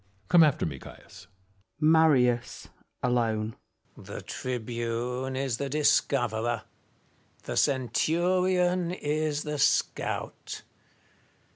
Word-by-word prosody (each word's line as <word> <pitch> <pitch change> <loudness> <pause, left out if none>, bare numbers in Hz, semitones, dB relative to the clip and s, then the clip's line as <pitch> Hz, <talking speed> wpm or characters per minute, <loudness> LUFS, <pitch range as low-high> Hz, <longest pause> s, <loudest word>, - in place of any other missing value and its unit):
Come 175 - +7
after 150 -4 +3
me, 70 -4 -5
Caius. 100 +7 -14 0.5
Marius 150 -7 +3 0.3
(alone). 115 -3 0 0.4
The - - -9
tribune 125 +1 -3
is 130 -3 -1
the 140 +2 -3
discoverer! 120 -6 +1 0.8
the - - -5
centurion 175 +6 +1
is 150 -3 -1
the 150 -1 -4
scout 150 +2 -1
130 Hz, 85 wpm, -28 LUFS, 120-155 Hz, 0.8 s, Come